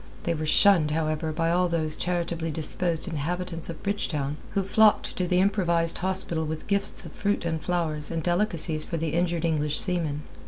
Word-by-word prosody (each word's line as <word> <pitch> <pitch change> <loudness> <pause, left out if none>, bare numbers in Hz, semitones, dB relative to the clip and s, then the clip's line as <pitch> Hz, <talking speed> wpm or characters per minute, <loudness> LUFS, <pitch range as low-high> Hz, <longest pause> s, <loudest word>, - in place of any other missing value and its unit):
They 170 - 0
were 155 -1 -3
shunned, 170 -2 +5
however, 155 0 -1
by 165 +1 0
all 180 +1 +2
those 155 -2 -1
charitably 170 -2 -2
disposed 165 +3 -1
inhabitants 170 +2 -3
of 165 - -8
Bridgetown 150 -8 -2 0.2
who 195 - +1
flocked 215 +2 +3
to 180 - -1
the 180 +1 +2
improvised 175 -4 +2
hospital 185 -3 -1
with 155 0 -5
gifts 200 0 -1
of - - -9
fruit 205 -3 -2
and 160 -2 -2
flowers 160 -4 -2
and 165 -1 -3
delicacies 175 -4 +3
for 165 - -4
the 160 0 -2
injured 170 -1 0
English 150 -2 0
seamen. 165 -7 -1
170 Hz, 180 wpm, -26 LUFS, 155-180 Hz, 0.2 s, shunned